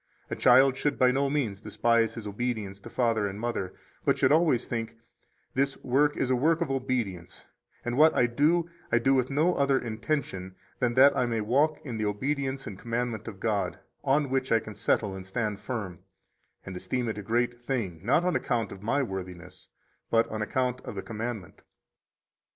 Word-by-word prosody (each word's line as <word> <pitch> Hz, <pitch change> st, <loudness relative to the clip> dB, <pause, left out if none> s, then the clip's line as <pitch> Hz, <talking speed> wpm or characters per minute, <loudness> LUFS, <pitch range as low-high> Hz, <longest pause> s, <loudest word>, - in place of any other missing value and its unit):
A -, -, -1 dB
child 135 Hz, 0 st, +6 dB
should 145 Hz, +1 st, -1 dB
by 125 Hz, 0 st, +5 dB
no 140 Hz, +2 st, +1 dB
means 120 Hz, -9 st, -1 dB
despise 115 Hz, +1 st, +1 dB
his 115 Hz, -3 st, -7 dB
obedience 105 Hz, -2 st, -3 dB
to -, -, -11 dB
father 115 Hz, -4 st, +1 dB
and 100 Hz, +1 st, -6 dB
mother, 110 Hz, -6 st, -3 dB, 0.3 s
but -, -, +2 dB
should -, -, +3 dB
always 155 Hz, -6 st, +3 dB
think: 115 Hz, -1 st, -4 dB, 0.6 s
This 135 Hz, 0 st, 0 dB
work 145 Hz, +3 st, +2 dB
is 130 Hz, -, 0 dB
a -, -, +4 dB
work 160 Hz, +6 st, +2 dB
of 170 Hz, -5 st, -1 dB
obedience, 120 Hz, -10 st, -3 dB, 0.4 s
and 120 Hz, 0 st, -1 dB
what 155 Hz, +1 st, +6 dB
I 125 Hz, -, +4 dB
do 155 Hz, +8 st, +2 dB, 0.2 s
I 115 Hz, -, +5 dB
do 135 Hz, +3 st, +3 dB
with 130 Hz, -2 st, +2 dB
no 155 Hz, +6 st, +2 dB
other 140 Hz, -3 st, +2 dB
intention 110 Hz, -6 st, -3 dB, 0.2 s
than 120 Hz, -1 st, +1 dB
that 135 Hz, +2 st, +7 dB
I 125 Hz, -, +1 dB
may 115 Hz, -1 st, -1 dB
walk 140 Hz, +8 st, +2 dB
in 120 Hz, -5 st, -4 dB
the 110 Hz, -1 st, 0 dB
obedience 135 Hz, +5 st, -2 dB
and 95 Hz, -, -7 dB
commandment 120 Hz, -1 st, -3 dB
of 100 Hz, -4 st, -7 dB
God, 105 Hz, -2 st, -1 dB, 0.3 s
on 140 Hz, 0 st, +2 dB
which 130 Hz, 0 st, 0 dB
I 115 Hz, -, +5 dB
can 110 Hz, -, -9 dB
settle 105 Hz, -1 st, 0 dB
and 95 Hz, -, -7 dB
stand 105 Hz, +1 st, -3 dB
firm, 100 Hz, -8 st, -5 dB, 0.7 s
and 95 Hz, -, -7 dB
esteem 125 Hz, +6 st, -2 dB
it 110 Hz, -2 st, -3 dB
a -, -, -4 dB
great 120 Hz, +3 st, 0 dB
thing, 115 Hz, -10 st, -3 dB
not 140 Hz, -, +3 dB
on 180 Hz, -, +1 dB
account 115 Hz, -6 st, -1 dB
of 95 Hz, -, -9 dB
my 135 Hz, +7 st, +1 dB
worthiness, 90 Hz, -4 st, -7 dB, 0.4 s
but 115 Hz, 0 st, +3 dB
on 110 Hz, 0 st, -4 dB
account 125 Hz, +3 st, -1 dB
of -, -, -8 dB
the 95 Hz, -, -4 dB
commandment. 110 Hz, -4 st, -6 dB
120 Hz, 190 wpm, -28 LUFS, 105-135 Hz, 0.7 s, that